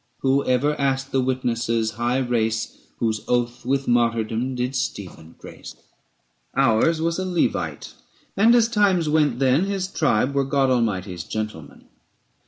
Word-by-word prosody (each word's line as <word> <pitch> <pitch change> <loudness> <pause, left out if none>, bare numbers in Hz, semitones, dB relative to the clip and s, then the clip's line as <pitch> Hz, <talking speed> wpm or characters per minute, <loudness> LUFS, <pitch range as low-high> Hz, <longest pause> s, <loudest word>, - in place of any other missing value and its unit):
Who 135 +1 +2
ever 130 +4 +1
asked 135 0 -1
the 135 - +1
witnesses' 115 -3 -1
high 120 +3 -1
race 115 -3 -1 0.2
Whose 110 -2 -1
oath 120 0 -1
with 135 +1 0
martyrdom 115 +1 0
did 125 +2 -2
Stephen 95 -10 -5
grace? - - -11 0.8
Ours 135 +6 +3
was 165 +2 -1
a - - -1
Levite, 180 -3 -2 0.4
and 225 +4 +5
as 235 -2 +4
times 200 -7 +2
went 150 -5 +2
then, 135 +6 +2
His 195 -2 -2
tribe 140 - +1
were 140 0 +1
God 135 -1 +1
Almighty's 95 -7 -1
gentlemen. 105 -9 -6
130 Hz, 140 wpm, -22 LUFS, 115-145 Hz, 0.8 s, and